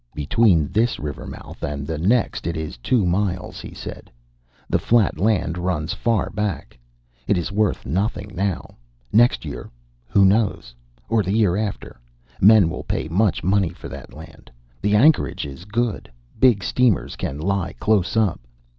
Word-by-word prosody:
"Between 80 Hz, +1 st, +2 dB
this 115 Hz, +4 st, +1 dB
river 75 Hz, -2 st, -6 dB
mouth -, -, -10 dB
and 70 Hz, -1 st, -3 dB
the 80 Hz, +1 st, -4 dB
next 110 Hz, +5 st, +1 dB
it 85 Hz, -1 st, -2 dB
is 80 Hz, -1 st, -5 dB
two 100 Hz, -, +1 dB
miles," 90 Hz, 0 st, -1 dB
he -, -, -9 dB
said. -, -, -8 dB, 0.6 s
"The -, -, +1 dB
flat 115 Hz, -3 st, +2 dB
land 95 Hz, -5 st, +1 dB
runs 85 Hz, -4 st, -1 dB
far 115 Hz, -4 st, 0 dB
back. 100 Hz, -7 st, -3 dB, 0.5 s
It 100 Hz, -, +2 dB
is 85 Hz, +2 st, -3 dB
worth 105 Hz, -1 st, 0 dB
nothing 100 Hz, -, -2 dB
now. 95 Hz, +1 st, -3 dB, 0.4 s
Next 120 Hz, +3 st, +4 dB
year -, -, -7 dB, 0.4 s
who 100 Hz, +9 st, +4 dB
knows? 95 Hz, -, +1 dB, 0.3 s
or 115 Hz, -, +2 dB
the 100 Hz, +2 st, -1 dB
year 100 Hz, -6 st, +3 dB
after, 100 Hz, -, -4 dB, 0.4 s
men 105 Hz, -2 st, +7 dB
will 80 Hz, -, -4 dB
pay -, -, -3 dB
much 95 Hz, +2 st, +1 dB
money 95 Hz, -1 st, +2 dB
for -, -, -10 dB
that -, -, -9 dB
land. -, -, -13 dB, 0.3 s
The 105 Hz, +1 st, +2 dB
anchorage 145 Hz, -, +3 dB
is 70 Hz, +5 st, -9 dB
good. 110 Hz, -, -2 dB, 0.3 s
Big 120 Hz, -7 st, +4 dB
steamers 125 Hz, -6 st, +1 dB
can 70 Hz, -, -4 dB
lie 95 Hz, +3 st, -1 dB
close 105 Hz, -1 st, +1 dB
up. 105 Hz, -6 st, +2 dB
100 Hz, 160 wpm, -22 LUFS, 85-110 Hz, 0.6 s, men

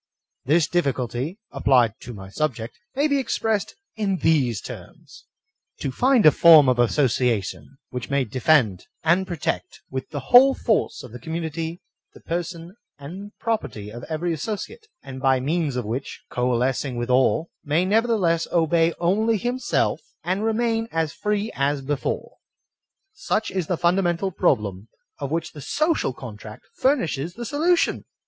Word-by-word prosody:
This 155 Hz, +4 st, +4 dB
difficulty, 140 Hz, -, -1 dB
applied 120 Hz, -5 st, +3 dB
to -, -, -9 dB
my 95 Hz, -4 st, -9 dB
subject, 120 Hz, -2 st, -3 dB, 0.2 s
may 285 Hz, +3 st, +2 dB
be 285 Hz, -2 st, +1 dB
ex 260 Hz, -, -1 dB
pressed 220 Hz, -3 st, -1 dB, 0.2 s
in 200 Hz, -3 st, 0 dB
these 135 Hz, -, +2 dB
terms: -, -, -11 dB, 0.3 s
— -, -, -58 dB
*To 135 Hz, -, -2 dB
find 250 Hz, -, +3 dB
a 155 Hz, -, +9 dB
form 160 Hz, -2 st, +7 dB
of 125 Hz, -1 st, +2 dB
association 125 Hz, -, 0 dB
which 125 Hz, -2 st, -5 dB
may 140 Hz, -1 st, +2 dB
defend 125 Hz, -, +2 dB, 0.2 s
and 175 Hz, +4 st, +2 dB
protect 150 Hz, -, -3 dB
with 130 Hz, 0 st, -4 dB
the 145 Hz, -, -4 dB
whole 265 Hz, +2 st, +8 dB
force 220 Hz, -, 0 dB
of 125 Hz, -, -10 dB
the 125 Hz, -, -9 dB
community 160 Hz, +3 st, -4 dB, 0.3 s
the -, -, -13 dB
per 170 Hz, +1 st, -2 dB
son 170 Hz, 0 st, -9 dB, 0.2 s
and 180 Hz, +9 st, -9 dB
property 135 Hz, -, -3 dB
of 120 Hz, +2 st, -9 dB
every 165 Hz, +2 st, -2 dB
associate, 225 Hz, -, -5 dB, 0.2 s
and 130 Hz, 0 st, -8 dB
by 135 Hz, -1 st, +3 dB
means 150 Hz, +1 st, -1 dB
of 125 Hz, -3 st, -2 dB
which, 120 Hz, +6 st, -5 dB
coalescing 125 Hz, +2 st, 0 dB
with 120 Hz, +1 st, -2 dB
all, 135 Hz, +6 st, +2 dB
may 160 Hz, +4 st, +1 dB
nevertheless 205 Hz, -5 st, +2 dB
obey 165 Hz, 0 st, +2 dB
only 215 Hz, +6 st, +2 dB
himself, 245 Hz, +3 st, 0 dB, 0.2 s
and 190 Hz, +4 st, -1 dB
remain 225 Hz, 0 st, 0 dB
as 160 Hz, -2 st, -1 dB
free 210 Hz, +1 st, -1 dB
as 140 Hz, 0 st, 0 dB
before.* 145 Hz, +1 st, -3 dB, 0.8 s
Such 220 Hz, -, -1 dB
is 185 Hz, -4 st, -2 dB
the 180 Hz, -, 0 dB
fundamental 175 Hz, +1 st, +1 dB
problem 100 Hz, -, 0 dB, 0.3 s
of 140 Hz, -, -3 dB
which 165 Hz, +1 st, -2 dB
the 150 Hz, -, -10 dB
social 310 Hz, -, 0 dB
contract 110 Hz, -3 st, -10 dB
fur 270 Hz, +3 st, +3 dB
nishes 165 Hz, -, -3 dB
the 240 Hz, -, -6 dB
solution. 330 Hz, +7 st, +1 dB
160 Hz, 155 wpm, -23 LUFS, 130-195 Hz, 0.8 s, a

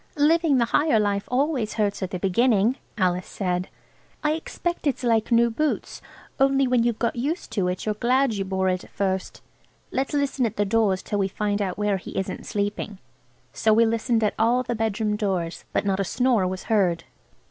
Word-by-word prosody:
"Living 310 Hz, 0 st, +4 dB
the 235 Hz, -, +3 dB
higher 290 Hz, -1 st, +2 dB
life 200 Hz, -1 st, 0 dB
always 255 Hz, -3 st, 0 dB
hurts 205 Hz, -2 st, 0 dB
at 190 Hz, -, -2 dB
the 185 Hz, -, -3 dB
beginning," 215 Hz, +4 st, +2 dB, 0.2 s
Alice 180 Hz, -2 st, 0 dB
said. 180 Hz, -2 st, -2 dB, 0.5 s
"I 300 Hz, -, +2 dB
expect 330 Hz, +1 st, -3 dB
it's 270 Hz, -, -1 dB
like 230 Hz, -1 st, +1 dB
new 235 Hz, 0 st, +4 dB
boots, 305 Hz, +6 st, -2 dB, 0.4 s
only 270 Hz, 0 st, +4 dB
when 250 Hz, -2 st, +2 dB
you've 235 Hz, -1 st, +1 dB
got 235 Hz, -, -1 dB
used 285 Hz, +9 st, -3 dB
to 195 Hz, -4 st, 0 dB
it 180 Hz, 0 st, -3 dB
you're 215 Hz, -, 0 dB
glad 250 Hz, +3 st, +2 dB
you 200 Hz, -2 st, -2 dB
bore 190 Hz, 0 st, -1 dB
it 185 Hz, 0 st, 0 dB
at -, -, -15 dB
first. 190 Hz, -1 st, -3 dB, 0.5 s
Let's 270 Hz, +3 st, -1 dB
listen 275 Hz, -3 st, +1 dB
at 215 Hz, -, -7 dB
the 205 Hz, -, +1 dB
doors 205 Hz, -3 st, +1 dB
till 205 Hz, -, -2 dB
we 195 Hz, -, +2 dB
find 205 Hz, +1 st, -2 dB
out 190 Hz, -3 st, -2 dB
where 210 Hz, -1 st, +1 dB
he 185 Hz, -, -8 dB
isn't 190 Hz, -, -4 dB
sleeping." 205 Hz, 0 st, -3 dB, 0.6 s
So 220 Hz, -, +2 dB
we 230 Hz, +2 st, +5 dB
listened 230 Hz, 0 st, +1 dB
at 210 Hz, -, +2 dB
all 240 Hz, +3 st, +3 dB
the 240 Hz, -1 st, -2 dB
bedroom 220 Hz, -1 st, -1 dB
doors, 185 Hz, -5 st, -2 dB
but -, -, 0 dB
not 195 Hz, -1 st, 0 dB
a -, -, +2 dB
snore 235 Hz, -1 st, +1 dB
was 185 Hz, 0 st, -4 dB
heard. 180 Hz, -6 st, +1 dB
215 Hz, 200 wpm, -24 LUFS, 195-250 Hz, 0.6 s, we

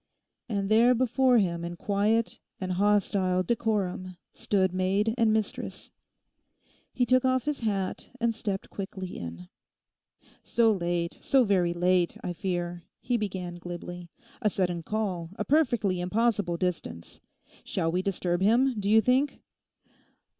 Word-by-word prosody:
And 200 Hz, -3 st, -1 dB
there 235 Hz, +3 st, +5 dB
before 255 Hz, +1 st, +3 dB
him 170 Hz, -5 st, +1 dB
in 170 Hz, 0 st, -5 dB
quiet 210 Hz, +5 st, 0 dB, 0.2 s
and 185 Hz, -1 st, -3 dB
hostile 190 Hz, -1 st, +2 dB
decorum 190 Hz, -4 st, -1 dB, 0.2 s
stood 190 Hz, -3 st, 0 dB
maid 195 Hz, +4 st, +1 dB
and 230 Hz, -3 st, +3 dB
mistress. 215 Hz, -1 st, -3 dB, 1.0 s
He 250 Hz, -, +1 dB
took 255 Hz, +1 st, +3 dB
off 260 Hz, -1 st, +2 dB
his 295 Hz, -1 st, -2 dB
hat 200 Hz, -4 st, -2 dB
and 235 Hz, -1 st, +1 dB
stepped 200 Hz, -3 st, -4 dB
quickly 190 Hz, -2 st, -6 dB
in. 85 Hz, +1 st, -7 dB, 1.0 s
'So 230 Hz, -1 st, +3 dB
late, 175 Hz, -3 st, -2 dB
so 270 Hz, -2 st, +4 dB
very 180 Hz, -5 st, +2 dB
late, 180 Hz, 0 st, +2 dB
I 180 Hz, -, -3 dB
fear,' 175 Hz, -1 st, -3 dB, 0.2 s
he 245 Hz, -, -1 dB
began 185 Hz, -5 st, -3 dB
glibly. 175 Hz, 0 st, -7 dB, 0.3 s
'A 215 Hz, -, +3 dB
sudden 180 Hz, -3 st, -1 dB
call, 185 Hz, -3 st, -2 dB
a 210 Hz, -, -3 dB
perfectly 240 Hz, -, +2 dB
impossible 205 Hz, -2 st, +1 dB
distance. 165 Hz, -, -4 dB, 0.4 s
Shall 165 Hz, -, -1 dB
we 180 Hz, +2 st, 0 dB
disturb 180 Hz, -2 st, -1 dB
him, 235 Hz, +4 st, +3 dB
do 200 Hz, 0 st, -1 dB
you 220 Hz, +1 st, +6 dB
think? 260 Hz, +4 st, +1 dB
195 Hz, 135 wpm, -28 LUFS, 180-225 Hz, 1.0 s, you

